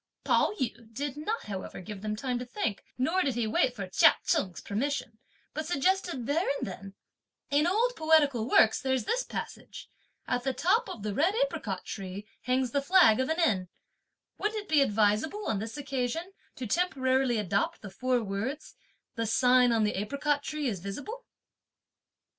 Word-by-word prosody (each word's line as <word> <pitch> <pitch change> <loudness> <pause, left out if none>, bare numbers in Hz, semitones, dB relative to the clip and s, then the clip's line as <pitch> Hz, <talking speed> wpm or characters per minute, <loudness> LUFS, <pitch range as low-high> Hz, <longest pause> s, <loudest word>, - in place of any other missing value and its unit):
Pao - - +3
yü 235 -3 -4
did 280 +4 -4
not 420 +10 -3
however 195 -3 -6
give 195 +1 -8
them 215 0 -2
time 250 +2 -2
to - - -4
think; 245 - -3
nor 320 +9 +1
did 270 -7 0
he 240 -2 0
wait 230 +3 +1
for 195 -4 -5
Chia 185 - +5
Cheng's 185 -3 0
permission, 225 0 -3 0.3
but 310 0 -4
suggested 345 -4 0
there 310 +8 +1
and - - -3
then: 195 +1 -8 0.6
"In 295 +3 +3
old 470 +7 +2
poetical 290 - +3
works 220 - +5
there's 260 -3 0
this 485 - 0
passage: - - -7 0.4
'At 245 0 0
the 265 -1 -1
top 430 +6 +2
of 225 - -7
the 210 -1 -2
red 335 - +2
apricot - - -5
tree 195 0 -6 0.2
hangs 255 0 +1
the 280 - +1
flag 280 - +5
of 260 - 0
an 320 +2 0
inn,' 335 - +5
and 185 - -10 0.7
wouldn't 425 0 -1
it - - -24
be 305 -2 +5
advisable, 215 - +1
on 205 - 0
this 225 +5 -5
occasion, 280 +6 -3 0.2
to 255 - -5
temporarily 260 - +1
adopt 200 0 -1
the 200 - -7
four 250 +3 0
words: 220 +9 -4 0.4
'the 230 -1 -2
sign 250 +2 +4
on 225 -2 +2
the 210 - +1
apricot 280 +7 0
tree 300 0 -3
is 205 -6 -2
visible'?" 290 - -7
255 Hz, 175 wpm, -29 LUFS, 215-310 Hz, 0.7 s, Chia